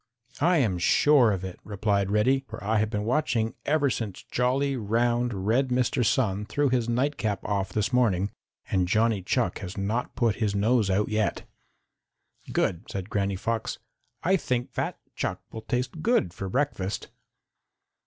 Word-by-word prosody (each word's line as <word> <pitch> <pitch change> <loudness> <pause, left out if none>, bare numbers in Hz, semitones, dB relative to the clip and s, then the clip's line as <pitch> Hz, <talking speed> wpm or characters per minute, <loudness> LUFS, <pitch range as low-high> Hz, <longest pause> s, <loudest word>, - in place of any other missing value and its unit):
"I 170 +4 +4
am 105 - +1
sure 130 +5 +5
of 95 -2 -2
it," 95 -1 -6
replied 100 -1 0
Reddy, 130 +6 +2
"for 115 - -8
I 110 +2 +2
have 110 0 +1
been 105 -1 -2
watching 125 -3 +1
ever 145 -2 +3
since 105 -6 -4
jolly, 135 +3 +1
round, 120 -2 0
red 125 +6 +2
Mr. 125 0 +1
Sun 105 -4 +1
threw 145 +2 +1
his 120 -2 +1
nightcap 120 -5 0
off 95 -2 -1
this 105 +4 -1
morning, 105 -6 +2 0.4
and 95 -2 +2
Johnny 110 +1 +2
Chuck 90 - 0
has 90 +1 -7
not 105 +5 -2
put 115 -3 +1
his 105 -3 0
nose 110 +1 +2
out 100 +2 +1
yet." 110 -1 -1 1.0
"Good," 85 -2 0
said 95 0 -5
Granny 100 -1 0
Fox, 115 +3 -2 0.5
"I 190 +2 +4
think 125 -7 -2
fat - - -2 0.2
Chuck - - -2
will 110 - -6
taste 125 +7 -3
good 220 - +2
for 95 0 -5
breakfast." 105 -6 -2
110 Hz, 160 wpm, -27 LUFS, 100-125 Hz, 1.0 s, sure